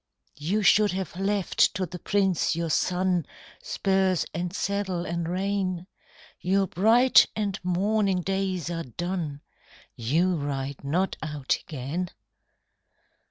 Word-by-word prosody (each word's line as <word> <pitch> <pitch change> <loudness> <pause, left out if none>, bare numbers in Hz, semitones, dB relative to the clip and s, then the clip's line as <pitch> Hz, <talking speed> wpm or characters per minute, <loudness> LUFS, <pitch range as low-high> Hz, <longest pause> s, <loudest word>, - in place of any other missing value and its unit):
"You 195 +8 0
should 205 +1 +5
have 190 -2 -4
left 195 0 +1
to 185 - 0
the 180 +1 -8
prince 190 -5 +1
your 165 -1 -2
son 180 +1 +1 0.4
Spurs 190 -2 +1
and 175 +2 -2
saddle 195 -3 -2
and 170 -1 -2
rein: 185 -1 -1 0.5
Your 195 +2 +2
bright 225 +9 +5
and 200 -3 -2
morning 190 +1 +1
days 190 -3 -1
are 165 -1 -2
done; 165 - -4 0.5
You 165 +10 +1
ride 140 -1 -4
not 175 +7 0
out 150 -3 -1
again." 155 +5 -3
180 Hz, 115 wpm, -26 LUFS, 165-195 Hz, 0.5 s, should